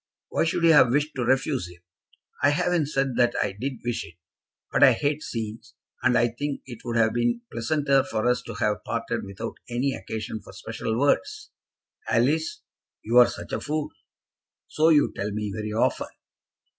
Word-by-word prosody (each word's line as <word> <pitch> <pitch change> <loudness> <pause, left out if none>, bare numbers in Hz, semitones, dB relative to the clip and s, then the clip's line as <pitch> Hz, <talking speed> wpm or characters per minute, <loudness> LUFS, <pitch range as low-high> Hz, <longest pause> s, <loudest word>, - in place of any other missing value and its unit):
"Why - - +1
should 165 +1 -1
you 165 -1 +7
have 135 -5 +7
wished 145 +4 +1
to 130 - -2
refuse 130 - +1
him?" 90 0 -16 0.6
"I 145 - +5
haven't 160 +1 +1
said 135 -4 -1
that 120 -1 +3
I - - 0
did 125 +8 -4
wish 120 -1 -1
it. 80 - -13 0.6
But - - +1
I - - +8
hate 145 +1 -1
scenes, 115 0 -6 0.3
and 125 - +3
I 120 +1 +3
think 140 +4 -4
it 120 -4 -9
would 120 -1 -2
have 110 -1 +3
been 120 - 0
pleasanter 135 +3 +2
for 110 - -2
us 125 0 +2
to 115 - -6
have 105 -1 -1
parted 115 0 -3
without 100 -1 -6
any 125 +3 0
occasion 110 -3 -5
for - - -14
special 110 0 -4
words." 425 - 0 0.6
"Alice, 145 +8 +1 0.4
you 115 +3 +1
are 125 - +8
such - - -8
a - - -2
fool!" 150 0 -2 0.8
"So 155 +1 +3
you 150 -3 +4
tell 100 +1 -2
me 105 -1 -3
very 110 0 -4
often." 110 - 0
125 Hz, 180 wpm, -25 LUFS, 110-145 Hz, 0.8 s, I